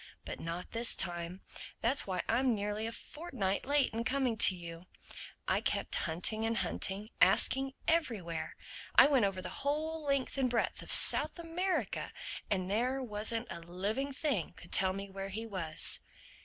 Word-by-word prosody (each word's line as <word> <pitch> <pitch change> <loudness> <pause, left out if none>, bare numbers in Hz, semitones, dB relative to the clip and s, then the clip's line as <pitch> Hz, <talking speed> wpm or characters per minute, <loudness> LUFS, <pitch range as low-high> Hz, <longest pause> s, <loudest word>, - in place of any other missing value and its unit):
But - - -6
not 170 +2 -6
this 230 +1 +3
time. 175 0 -2 0.4
That's 265 +4 +4
why 185 -2 -2
I'm 245 +1 +2
nearly 210 +2 -2
a - - -4
fortnight 255 - -4
late 285 -4 +2
in 230 +1 -2
coming 260 -2 0
to 190 - +5
you: 170 0 -9 0.6
I - - +1
kept - - -2
hunting 180 +7 0
and 225 0 0
hunting, 200 0 -2
asking 270 0 +3
everywhere. 195 - -1 0.4
I - - +9
went 270 -7 +3
over 190 -2 -3
the 185 - -5
whole 310 +3 -2
length 275 -1 -1
and 255 -2 +2
breadth 235 -1 -1
of - - -7
South - - +8
America. 345 +3 -2 0.4
But 185 -3 -1
there 250 +7 0
wasn't 225 +1 -2
a - - -6
living 200 +11 -3
thing 270 - -2
could - - -12
tell 190 -1 +5
me 195 +1 -6
where 195 0 -6
he 220 +4 -5
was." 175 -8 -1
220 Hz, 165 wpm, -32 LUFS, 190-270 Hz, 0.6 s, I